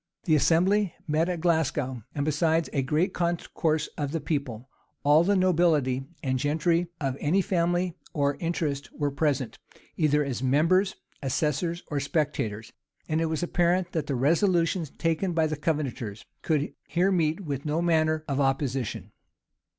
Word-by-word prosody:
[] - - -64
The 165 - +3
assembly 180 +5 +3
met 160 +3 +1
at 175 -3 -2
Glasgow; 150 -7 0
and, 145 -1 -1
besides 160 +2 +1
a 140 - +1
great 155 +8 0
concourse 170 -2 0
of 145 0 -2
the 165 - 0
people, 140 -6 -3 0.4
all 150 +3 +5
the 200 +3 +2
nobility 155 -8 +2 0.2
and 130 -2 0
gentry 165 +5 +1
of 135 -3 -1
any 165 +7 +2
family 175 -2 0 0.2
or 140 -1 +1
interest 155 -5 -2
were 145 -2 -1
present, 140 -3 -1 0.4
either 150 -2 +2
as 130 -3 -3
members, 165 +9 +3 0.3
assessors, 155 +5 -1
or 145 - 0
spectators; 115 -7 -2 0.3
and 160 +1 0
it 165 - +1
was 160 +2 -2
apparent 175 +1 +1
that 160 -4 -2
the 140 - -1
resolutions 165 +4 +2
taken 165 +4 -1
by 160 -1 +2
the 155 0 -1
Covenanters 140 -9 -3 0.2
could 155 -2 0
here 180 +3 +2
meet 165 -1 +1
with 140 -6 -4
no 155 +1 -1
manner 155 -2 +1
of 140 -2 -1
opposition. 135 -3 -1
155 Hz, 155 wpm, -27 LUFS, 140-170 Hz, 0.4 s, all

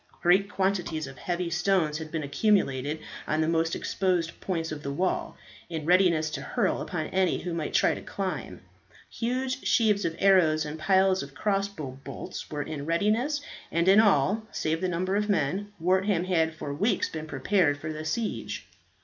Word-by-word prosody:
Great 190 +3 +4
quantities 190 -6 -1
of 135 -2 -10
heavy 175 -1 -2
stones 175 -3 +1
had 160 -1 -7
been 160 -1 -2
accumulated 145 -4 +1 0.3
on 155 - 0
the 160 - +2
most 165 0 +1
exposed 180 -4 -1
points 165 -4 -2
of 150 -1 -5
the 140 - -4
walls, 180 +6 -1 0.3
in 160 -3 -4
readiness 170 -3 +3
to 145 -3 -4
hurl 210 - 0
upon 160 -3 -3
any 190 -1 +1
who 175 -1 -3
might 165 -3 -3
try - - +3
to - - -6
climb. 195 -2 -4 0.5
Huge 255 +2 -2
sheaves 210 -3 +3
of 165 -1 -1
arrows 170 -6 +4
and 150 +1 -6
piles 190 +3 +3
of 140 0 -9
crossbow 195 -10 -2
bolts, - - -7
were 145 -1 -3
in 145 -1 -6
readiness, 220 - +1 0.3
and 170 +2 +1
in 195 +2 +7
all, 205 0 +4
save 160 +2 -1
the 185 - 0
number 185 +3 -1
of 210 +1 0
men, 195 +3 0
Wortham 185 +1 +2
had 165 -3 +1
for 145 -3 -5
weeks 205 +11 +1
been 155 -1 -6
prepared 145 +2 +2
for 155 +2 -5
the 155 0 -6
siege. 215 +8 -3
175 Hz, 175 wpm, -27 LUFS, 155-195 Hz, 0.5 s, in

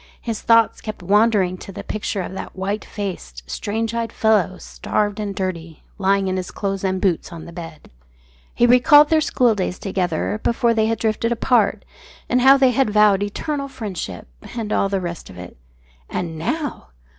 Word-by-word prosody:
His 230 -3 -4
thoughts 230 -1 +3
kept 215 -4 -7
wandering 200 -2 +2
to - - -9
the - - -8
picture 205 -2 -3
of 180 - -7
that - - -7
white 200 +3 -3
faced, 175 - -6
strange 225 - -3
eyed 230 -1 -2
fellow, 210 -5 +2
starved 205 0 -2
and 205 -2 -3
dirty, 170 -4 -5 0.2
lying 195 0 +2
in 185 0 -1
his 185 -1 -4
clothes 195 -1 -3
and 190 -1 0
boots 185 -4 0
on 170 -2 -9
the 170 - -10
bed. 165 -3 -10 0.6
He 240 - +4
recalled 290 +5 +6
their 315 -1 +4
schooldays 220 -11 +1
together 175 - -2
before 235 0 +2
they 220 -1 +2
had 225 0 0
drifted 225 +1 0
apart, 235 +1 +1 0.4
and 250 +1 +2
how 270 +2 +7
they 265 -2 +4
had 255 -1 +2
vowed 210 -2 +4
eternal 275 +8 -3
friendship 190 - -6 0.3
and 215 -2 -2
all 195 - +1
the 195 -1 0
rest 175 -2 -6
of 90 - -12
it. 90 0 -10 0.5
And 165 -2 -3
now! 285 - -3
205 Hz, 180 wpm, -21 LUFS, 185-230 Hz, 0.6 s, how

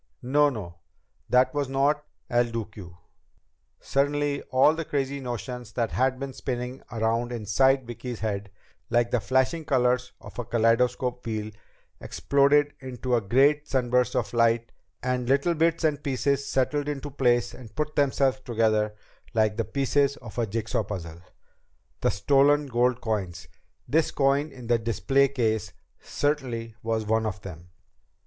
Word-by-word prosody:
No, 145 +4 +4
no. 95 -10 -7 0.5
That 125 +1 +4
was 145 -2 -1
not 140 +2 +1 0.2
El 120 0 +2
Duque." 105 -6 -7 0.9
Suddenly 145 +1 0
all 130 +4 +5
the 165 +1 -3
crazy 140 -2 -2
notions 125 -2 -6
that 115 -2 -1
had 130 0 +1
been 140 -1 -5
spinning 125 0 -4
around 115 +1 0
inside 125 +4 +2
Vicki's 120 0 -7
head, 100 -2 -3 0.4
like 120 0 +2
the 125 - +2
flashing 130 +8 +1
colors 125 -2 +1
of - - -11
a - - -1
kaleidoscope 120 +2 +1
wheel, 110 -1 -4 0.5
exploded 140 +1 +2
into 130 -1 -4
a 120 - +3
great 140 +8 +3
sunburst 125 0 +1
of 120 -4 -1
light, 115 0 +2 0.3
and 125 -1 -1
little 140 +6 +3
bits 165 +1 +1
and 150 -2 +1
pieces 140 0 0
settled 145 +3 0
into 145 0 -4
place 120 -3 +1
and 115 -4 -12
put 150 0 -2
themselves 135 -2 +2
together 110 -3 0 0.4
like 110 -1 +2
the 115 - 0
pieces 140 +2 +1
of 120 -1 -8
a 115 - +1
jigsaw 110 +1 -1
puzzle. 85 -4 -7 0.8
The - - +2
stolen 140 +7 +3
gold 125 -1 +1
coins! 95 -8 -3 0.4
This 160 +1 +2
coin 140 +2 +1
in 130 -3 -11
the 120 0 +2
display 135 +5 +2
case 115 -5 -1 0.3
certainly 125 -6 -2
was 110 -1 -1
one 110 +1 +1
of 100 -2 -5
them! 90 -2 -10
125 Hz, 145 wpm, -26 LUFS, 115-140 Hz, 0.9 s, all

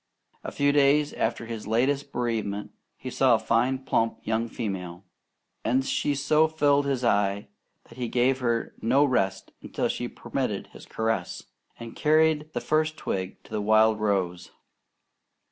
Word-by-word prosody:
A - - -5
few 145 0 +2
days 145 +1 +3
after 115 +1 -2
his 115 -2 -6
latest 135 +5 0
bereavement, 110 -4 -2 0.3
he 130 - -7
saw 130 -2 +4
a - - +2
fine, 125 +4 0
plump 115 -3 +1
young 115 +1 -1
female; 95 -6 -5 0.6
and 130 +2 +1
she 145 +1 0
so 150 +3 +3
filled 145 -2 +2
his 135 -2 -1
eye 100 -2 +1 0.3
that 115 - -16
he 120 - -2
gave 125 +3 +1
her 120 -2 -1
no 135 +6 +4
rest 95 -8 -1
until - - -2
she - - -3
permitted - - -4
his - - -13
caresses, 110 -5 -2 0.3
and 115 -1 -9
carried 155 0 +2
the 120 - -2
first 155 +4 0
twig 95 -7 -4
to - - -19
the 105 - -2
wild 110 +1 +4
rose. 95 -4 -1
120 Hz, 155 wpm, -26 LUFS, 110-140 Hz, 0.6 s, saw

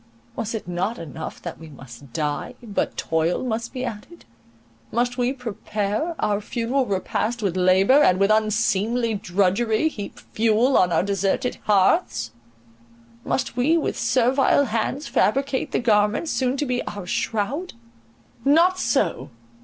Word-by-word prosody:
Was 225 +1 -3
it 215 - -6
not 180 +6 -2
enough 160 -1 -7
that - - -6
we 160 -1 -11
must 135 -2 -13
die, 150 +1 -3
but 210 -4 -2
toil 160 +5 0
must 235 -1 -3
be 255 -1 -4
added?—must 120 - -6
we 245 0 +1
prepare 225 - -3
our 205 0 0
funeral 245 +4 -1
repast 215 +4 -2
with 190 -3 0
labour, 190 +9 +5
and 185 -9 +4
with 195 +1 +3
unseemly 220 +2 +1
drudgery 205 - +1
heap 205 -9 -8
fuel 230 +4 +1
on 180 -1 +4
our 165 - +2
deserted 200 +4 -1
hearths 150 - +2 0.9
—must 135 +9 -2
we 285 +7 +3
with 320 - -1
servile 255 +4 +3
hands 235 +5 -2
fabricate 270 +3 0
the - - +1
garments, 215 +5 +2
soon 260 +1 0
to 290 - -1
be 250 -2 -1
our 200 -3 -6
shroud? 235 - -2 0.7
Not 340 +6 +4
so! - - 0
215 Hz, 135 wpm, -23 LUFS, 185-250 Hz, 0.9 s, labour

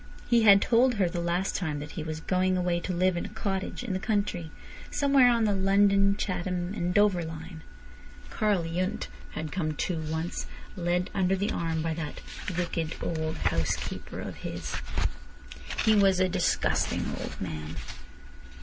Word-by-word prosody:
He 235 -1 +4
had 200 -2 +7
told 245 +1 +4
her 195 -4 +2
the 175 0 -3
last 175 +3 0
time 155 -6 -1
that 145 +1 -6
he 165 - -5
was 155 0 -4
going 185 +1 +1
away 175 -1 +1
to 185 - -4
live 180 +1 +2
in 175 - -2
a - - -13
cottage 195 +3 -2
in 230 -6 -3
the 185 - -1
country, 200 -6 -1 0.4
somewhere 275 -3 +5
on 235 -2 +3
the 210 -2 +3
London, 195 +1 +4
Chatham, 180 -1 -2
and 175 -4 -1
Dover 200 -3 +3
line. 160 +1 -7 0.7
Karl 205 -5 +1
Yundt 185 +6 -2 0.2
had 155 -1 -4
come 155 -4 -1
too, 170 +2 -1
once, 160 +2 -3 0.3
led 180 0 0
under 190 -1 +2
the 200 +3 -1
arm 165 -1 -1
by 165 0 0
that 160 -2 -5 0.4
"wicked 165 -2 -1
old 160 -1 -2
housekeeper 80 - -2
of - - -6
his." - - -5 1.1
He 220 - +6
was 195 -3 +5
"a 185 - +4
disgusting 180 -1 +1
old - - -6
man." 75 +1 -5
180 Hz, 165 wpm, -28 LUFS, 165-200 Hz, 1.1 s, had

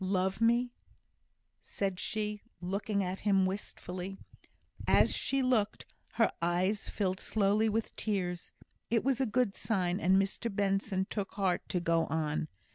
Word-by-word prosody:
"Love 190 +2 0
me!" 240 +2 +3 0.9
said 195 -2 -3
she, 210 -1 -2 0.2
looking 200 +2 -1
at 185 +1 -3
him 195 -2 +3
wistfully. 185 -1 -5 0.7
As - - +5
she 270 -1 +1
looked, 225 -5 +1 0.3
her 225 -1 +3
eyes 180 +4 +1
filled 185 -2 -1
slowly 210 +1 +2
with 220 +1 -2
tears. 180 -5 -2 0.4
It 230 -1 +2
was 270 0 +1
a 265 - +2
good 225 -2 +1
sign, 185 -4 0
and 190 0 +4
Mr 195 +4 0
Benson 195 -1 0
took 205 -2 -3
heart 190 -3 0
to 180 - +1
go 165 -1 +2
on. 155 -1 -1
195 Hz, 140 wpm, -32 LUFS, 185-215 Hz, 0.9 s, As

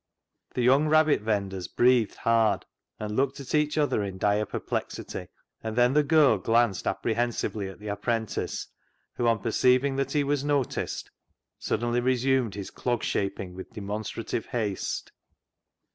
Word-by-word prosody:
The 125 - +1
young 135 +5 +5
rabbit 155 -4 +4
vendors 100 -4 -2
breathed 120 -3 +3
hard 115 -4 +2 0.3
and 105 0 -4
looked 135 +2 0
at 140 - -7
each 150 0 +2
other 145 -7 +2
in 95 -2 -5
dire 105 +2 +1
perplexity, - - -4 0.3
and 110 -1 -4
then 125 +1 +4
the 150 - +5
girl 145 -7 +4
glanced 115 0 +2
apprehensively 110 -3 -1
at 95 - -11
the 105 0 -7
apprentice, 110 +1 -2 0.5
who, 120 - 0
on 115 -1 +4
perceiving 130 +4 +3
that 135 0 -1
he 145 -1 +2
was 140 0 0
noticed, 145 -3 -1 0.5
suddenly 120 +2 0
resumed 130 -3 +1
his 100 -2 -6
clog 120 -2 -2
shaping 100 -2 -2
with 95 +1 -9
demonstrative 105 +2 -4
haste. 110 -6 -3
120 Hz, 145 wpm, -27 LUFS, 105-135 Hz, 0.5 s, young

